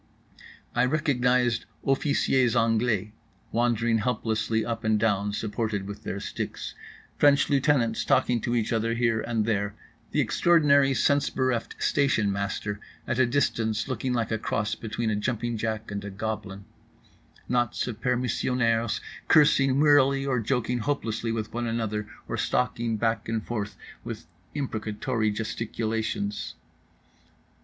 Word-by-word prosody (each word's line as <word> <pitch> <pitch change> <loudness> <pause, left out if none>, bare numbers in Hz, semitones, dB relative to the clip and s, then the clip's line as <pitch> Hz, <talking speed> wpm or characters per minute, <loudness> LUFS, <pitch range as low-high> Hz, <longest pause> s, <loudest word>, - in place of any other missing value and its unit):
I 120 +1 +3
recognized 125 -5 +2 0.2
officiers 135 -3 +2
anglais 110 -2 +1 0.4
wandering 115 -1 +2
helplessly 110 -1 0
up 115 -1 -3
and 110 -1 +2
down, 105 -2 +1
supported 105 -1 -2
with 100 +1 -7
their 100 - -4
sticks; - - -5 0.5
French 145 -1 +4
lieutenants 135 -5 +2
talking 120 -2 +2
to 120 - -1
each 115 0 0
other 115 +1 0
here 115 -2 +1
and 115 -2 -1
there; 100 -2 -1 0.3
the - - -1
extraordinary 140 -5 +4
sense 140 +3 +2
bereft 130 -3 -1
station 115 -8 +2
master 100 +1 -3 0.3
at 120 - -1
a 130 - +5
distance 115 -4 0
looking 130 0 -2
like 120 -2 -1
a 110 - 0
cross 110 -1 -1
between 110 0 -2
a - - +1
jumping 120 +2 -1
jack 110 -1 -3
and 100 0 -4
a 100 - -5
goblin; 100 -1 -5 0.8
knots 120 -1 0
of 120 -4 -6
permissionnaires 120 -2 +1 0.3
cursing 140 -3 +5
wearily 140 -2 +4
or 130 -3 +1
joking 125 +1 0
hopelessly 115 -3 -2
with 110 -1 -3
one 120 0 -2
another 110 -2 -2 0.2
or - - -3
stalking 115 -2 0
back 115 0 -1
and 110 -1 -2
forth 105 -4 -3 0.3
with - - -6 0.3
imprecatory 110 -3 -1
gesticulations. 110 -1 -3
115 Hz, 130 wpm, -27 LUFS, 110-125 Hz, 0.8 s, a